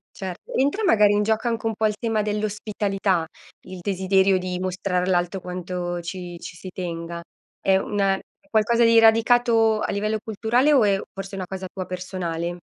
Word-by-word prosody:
Certo, 185 -2 -7
entra 285 +12 +1
magari 210 - +5
in 210 0 +2
gioco 220 +2 0
anche 230 -1 -2
un 225 - +1
po' 215 +1 +1
il 210 - -2
tema 225 -2 0
dell'ospitalità, 205 -3 -1 0.4
il 185 0 -10
desiderio 190 0 +2
di 180 0 -3
mostrare 185 0 -1
all'alto 180 +1 0
quanto 180 -1 -4
ci 175 0 -6
ci 170 0 -9
si 185 +2 -9
tenga. 170 -2 -5 0.4
È 190 0 +3
una 195 0 +1
un 195 - -4 0.4
qualcosa 235 +2 +2
di 230 0 +6
radicato 225 0 +4
a - - -1
livello 215 +2 -1
culturale 235 +6 +1
o 270 -5 +5
è 200 -2 +3
forse 195 0 -8
una 190 -2 -4
cosa 190 0 -6
tua 185 -2 -5
personale? 175 -2 -4
195 Hz, 175 wpm, -23 LUFS, 180-220 Hz, 0.4 s, di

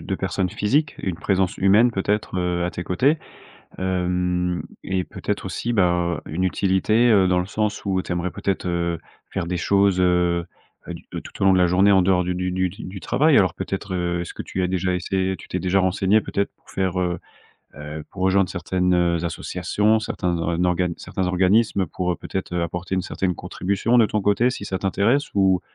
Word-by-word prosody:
de - - -1
personnes 95 -1 -1
physiques, 140 - 0
une 90 -3 -3
présence 95 +1 0
humaine 105 +6 +5
peut-être, 105 -2 -1
heu, 90 -1 0
à 90 - -1
tes 90 - -5
côtés? 135 - +2 0.6
Hem 90 -1 -1 0.2
et 95 -1 -1
peut-être - - -4
aussi, 120 - -3
bah, 90 -4 +1
une 85 +4 -3
utilité, 100 +5 +2
heu, 95 -3 +5
dans 90 - +2
le 90 - -1
sens 105 +1 -2
où 95 -2 0
tu - - -11
aimerais 90 +1 -1
peut-être, 95 -2 -2
heu, 85 -1 -1 0.3
faire 85 - -3
des 90 +1 -2
choses, 100 +1 +2
heu, 90 -1 +2 0.4
du - - -7
de - - -4
tout - - -9
au - - +4
long 95 - +6
de 95 - +4
la 90 - +5
journée 95 +3 +4
en 95 -1 +5
dehors 90 -1 +2
du 90 0 -1
du 90 0 -2
du 95 0 0
du 95 +1 -8
travail. 150 - +3
Alors 95 -4 +2
peut-être, 95 +1 -4 0.3
est-ce 85 - -6
que - - -5
tu 95 - -3
as - - +2
déjà 95 0 0
essayé 95 +1 -1
tu - - -13
t'es 90 - -2
déjà 95 +1 +2
renseignée 95 +3 +2
peut-être 100 -1 -2
pour - - -21
faire, 95 -1 -1
heu 90 -1 -1 0.6
heu, 75 +1 -7
pour 95 - -6
rejoindre 95 0 +3
certaines, 90 +1 0
heu, 85 -1 +1
associations, 100 +6 0
certains 90 -5 -2
org 85 +1 0
organes 90 -1 +1
certains 95 - -3
organismes 95 +2 +2
pour, 90 -1 -2
heu, - - -5
peut-être 95 -2 -5
apporter 90 +2 -3
une 95 - +1
certaine 95 -2 -2
contribution 100 +10 0
de 115 - +6
ton 105 - -1
côté, 105 +5 +3
si 115 -5 -6
ça 95 -2 -3
t'intéresse? 105 +9 +1
Ou 95 -2 +3
95 Hz, 205 wpm, -22 LUFS, 90-100 Hz, 0.6 s, long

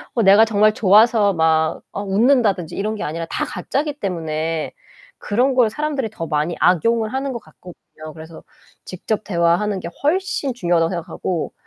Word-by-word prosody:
어 230 - +2
내가 200 +3 +6
정말 215 -1 +3
좋아서 210 0 +4
막 160 -1 +1
아 200 - -4
웃는다든지 205 - +1
이런 215 +2 -2
게 210 - -5
아니라 165 +2 -4
다 - - -2
가짜기 285 - -3
때문에 160 -4 -3 0.5
그런 250 +6 0
걸 250 -3 +3
사람들이 285 -2 -3
더 165 -6 -6
많이 155 +3 -1
악용을 220 +6 +2
하는 270 0 -2
것 235 - -5
같거든요. 155 -2 -14
그래서 160 +1 -12 0.4
직접 210 +4 -4
대화하는 185 +2 0
게 170 - -6
훨씬 305 -4 0
중요하다고 170 -7 +1
생각하고 170 0 -4
200 Hz, 355 characters per minute, -20 LUFS, 170-230 Hz, 0.5 s, 내가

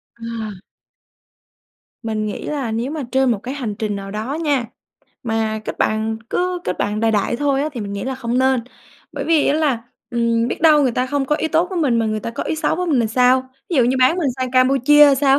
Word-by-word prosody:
Ờ. 230 - -12 1.8
Mình 215 -2 -2
nghĩ 210 - -5
là 280 -6 -2
nếu 235 +4 -2
mà 310 -1 -4
trên 265 -1 +3
một 225 - +1
cái 255 +2 -5
hành 240 -7 -4
trình 210 0 -3
nào 195 0 -7
đó 215 +7 -4
nha, 285 -6 +1 0.6
mà 220 -2 -1
kết - - -5
bạn 220 +1 0
cứ 360 0 -1
kết - - -2
bạn 210 +1 -1
đại 225 0 +2
đại 215 +2 0
thôi 280 0 +1
á 300 - -1
thì 245 - -5
mình 200 -1 -5
nghĩ 200 -1 -4
là 265 0 -2
không 245 -1 -2
nên. 260 -1 +3 0.5
Bởi - - -4
vì 320 -3 +3
á - - +3
là, 285 -7 +1 0.3
ừm, 235 0 +1
biết - - -4
đâu 310 -3 +6
người 255 -3 +2
ta 250 +2 0
không 280 +1 -1
có 300 - +1
ý 320 - -1
tốt 325 +2 +2
với 370 - -2
mình 255 -7 +2
mà 225 - +1
người 215 0 -1
ta 230 - -4
có 230 - -4
ý - - -2
xấu 315 - 0
với 360 +1 -2
mình 290 -7 +2
thì 230 - +1
sao? 255 +3 +2 0.2
Ví 340 - 0
dụ 250 - +5
như 255 +2 +1
bán 255 +7 +4
mình 315 -6 +1
sang 255 -1 -2
Campuchia 275 +3 +5
sao 270 0 +3
255 Hz, 245 wpm, -20 LUFS, 225-285 Hz, 1.8 s, đâu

